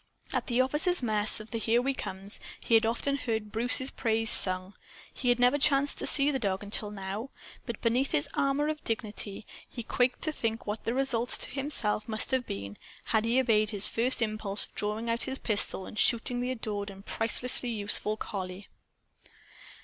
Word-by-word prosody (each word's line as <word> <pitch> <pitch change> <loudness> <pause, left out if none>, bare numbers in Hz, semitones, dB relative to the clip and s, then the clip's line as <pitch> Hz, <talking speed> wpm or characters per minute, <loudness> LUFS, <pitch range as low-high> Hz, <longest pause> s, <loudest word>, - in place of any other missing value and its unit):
At - - -2
the 245 0 +2
officers' 295 +5 +4
mess 215 -2 +2
of 215 +1 -12
the 230 - -3
"Here 230 +2 +1
We 270 +2 -1
Comes," 195 -4 -3 0.3
he - - -1
had 225 0 +4
often 275 +5 -1
heard 220 -5 -3
Bruce's 245 +4 +3
praises 225 -1 +4
sung. 185 +1 +3 0.4
He 250 - -2
had 245 0 +2
never 250 +4 +3
chanced 285 -1 +2
to - - -2
see 285 0 +5
the 270 - -2
dog 195 -3 -2
until 205 +1 -2
now. 205 +4 -6 0.4
But, 235 -3 -6
beneath 250 +4 +1
his 145 - +2
armor 275 +2 0
of 310 0 -4
dignity, 215 -2 -5 0.2
he 235 - -7
quaked 245 +2 -1
to 310 - 0
think 230 -6 -4
what 210 +1 -5
the 230 - -2
results 255 -3 +2
to - - -3
himself 255 -7 -1
must 220 +3 0
have 260 -2 -1
been, 100 +1 -6 0.3
had 220 -1 0
he 235 +3 +2
obeyed 215 -4 +2
his 205 -2 +1
first 240 +1 +1
impulse 215 -2 +2
of - - -22
drawing 210 +2 -3
his 240 +3 -1
pistol 205 -5 +1
and 215 - -8
shooting 245 +1 +2
the 250 - -3
adored 215 -5 -4
and 195 0 -13
pricelessly 245 +2 0
useful 215 -1 -2
collie. 190 -2 -7
225 Hz, 190 wpm, -28 LUFS, 210-255 Hz, 0.4 s, see